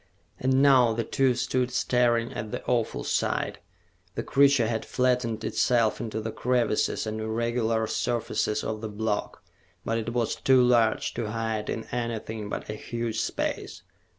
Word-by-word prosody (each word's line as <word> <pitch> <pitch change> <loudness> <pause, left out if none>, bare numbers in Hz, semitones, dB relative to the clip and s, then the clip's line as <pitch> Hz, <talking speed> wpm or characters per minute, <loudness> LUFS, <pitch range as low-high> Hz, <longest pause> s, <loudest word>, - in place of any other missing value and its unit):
And 130 +1 +3
now 130 -5 +6
the 115 +1 -1
two 130 +2 +1
stood 125 0 0
staring 120 -2 +1
at 110 0 -5
the - - -5
awful 120 -3 0
sight. - - -1 0.6
The - - -2
creature 140 -3 +4
had 110 0 -1
flattened 125 -3 0
itself 115 -2 +1
into 110 -2 -3
the 110 +1 -4
crevices 120 -4 0
and 110 0 -3
irregular 115 0 0
surfaces 110 -1 -1
of 110 -1 -3
the 110 - -4
block, 105 0 -3 0.4
but 115 0 0
it 115 +1 -4
was 120 -2 0
too 130 -1 +4
large 120 -3 +3
to 115 -3 -3
hide 110 -1 -2
in 110 - -3
anything 110 -3 -3
but - - -5
a 105 - -4
huge 115 +1 -4
space. - - -3
115 Hz, 155 wpm, -27 LUFS, 110-125 Hz, 0.6 s, now